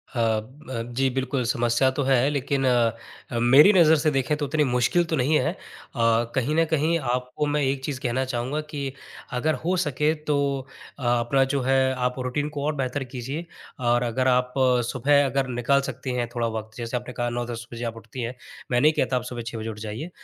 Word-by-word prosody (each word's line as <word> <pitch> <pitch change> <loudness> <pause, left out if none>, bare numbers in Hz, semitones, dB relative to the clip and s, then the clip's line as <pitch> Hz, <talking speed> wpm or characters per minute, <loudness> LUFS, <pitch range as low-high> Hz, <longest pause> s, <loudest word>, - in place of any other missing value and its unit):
अ - - -1
अ, 115 +3 -2
जी 135 +2 +2
बिल्कुल, 130 0 -1
समस्या 120 +2 +2
तो 145 - +1
है 135 0 +3
लेकिन 140 -1 -1 0.8
मेरी 135 - +7
नज़र 160 -3 +6
से 155 0 +2
देखें 135 +1 +1
तो 150 - -2
उतनी 150 +2 +1
मुश्किल 125 +6 +2
तो - - +3
नहीं 145 +3 +2
है 155 - 0
अ, - - -19 0.8
कहीं 130 +4 0
न 165 +1 +4
कहीं 160 +2 +2
आपको 125 +2 -2
मैं 145 0 +1
एक 135 0 -1
चीज़ 140 -3 -3
कहना 130 +2 0
चाहूँगा 130 +4 -2
कि 140 -3 -4 0.5
अगर 155 +4 +1
हो 180 +3 +1
सके 150 +2 +1
तो 150 - +2 0.6
अ, - - -7
अपना 120 +3 +2
जो 140 - +1
है 130 0 +2
आप 125 0 -2
रूटीन 130 +4 -2
को 145 -2 -5
और 155 0 0
बेहतर 135 0 -2
कीजिए 135 +7 -4 0.4
और 120 +1 +3
अगर 125 +2 0
आप 125 0 +2 0.4
सुबह 140 +3 +3
अगर 135 0 0
निकाल 125 +3 +1
सकती 130 +1 -5
हैं 120 -1 -1
थोड़ा 120 -1 0
वक़्त 110 0 -8
जैसे 120 +1 -3
आपने 125 +1 -7
कहा 120 0 -1
9-10 120 -1 -5
बजे 115 - -5
आप 115 - -4
उठती 125 +3 -8
हैं, 120 +2 -4 0.4
मैं 120 0 +3
नहीं 155 +2 +5
कहता 130 - 0
आप 125 - -3
सुबह 120 -1 -4
6 115 - -5
बजे 110 0 -4
उठ 105 -1 -7
जाइए। 110 +10 -5
130 Hz, 210 wpm, -25 LUFS, 120-145 Hz, 0.8 s, मेरी